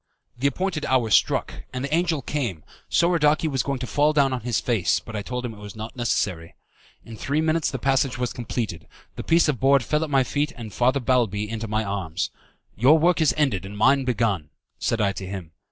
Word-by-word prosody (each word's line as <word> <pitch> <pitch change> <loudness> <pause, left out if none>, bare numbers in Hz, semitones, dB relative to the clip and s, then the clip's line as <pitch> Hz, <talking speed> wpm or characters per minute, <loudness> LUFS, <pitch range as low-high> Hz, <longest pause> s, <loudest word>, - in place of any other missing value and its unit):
The 130 +3 +1
appointed 170 +2 -2
hour 125 -4 +2
struck - - +3 0.2
and 130 +1 -3
the 140 - -4
angel 165 -4 +1
came, 120 - -3 0.3
Soradaci 160 -2 +3
was 135 -4 0
going 140 -1 -2
to 125 - -4
fall 145 +4 +2
down 140 -3 +3
on 125 - -3
his 120 0 0
face, 95 -11 +1
but 115 - -10
I 105 - -2
told 125 +3 -4
him 115 - -5
it 105 - -13
was 105 0 -9
not 110 +3 -7
necessary. 100 -8 -1 0.5
In 115 - -9
three 140 +7 -1
minutes 160 0 +1
the 135 - -3
passage 135 0 +1
was 125 -1 -2
completed, 110 -8 -4 0.3
the - - -5
piece 165 0 +3
of 140 -6 0
board 135 -1 +4
fell 150 +5 0
at 160 - -4
my 135 -2 +3
feet, 145 +4 -1
and 110 -4 -8
Father 130 +5 +2
Balbi 115 -5 +1
into 115 +1 -4
my 110 +1 0
arms. 95 -4 -3 0.4
"Your 135 +9 +5
work 170 +1 +3
is 155 - +3
ended 135 -12 +1
and 100 +1 -8
mine 135 +5 +4
begun," 105 - 0 0.3
said 115 - 0
I 100 -2 +2
to 95 -1 -7
him. 95 -4 -7
125 Hz, 220 wpm, -24 LUFS, 105-145 Hz, 0.5 s, Your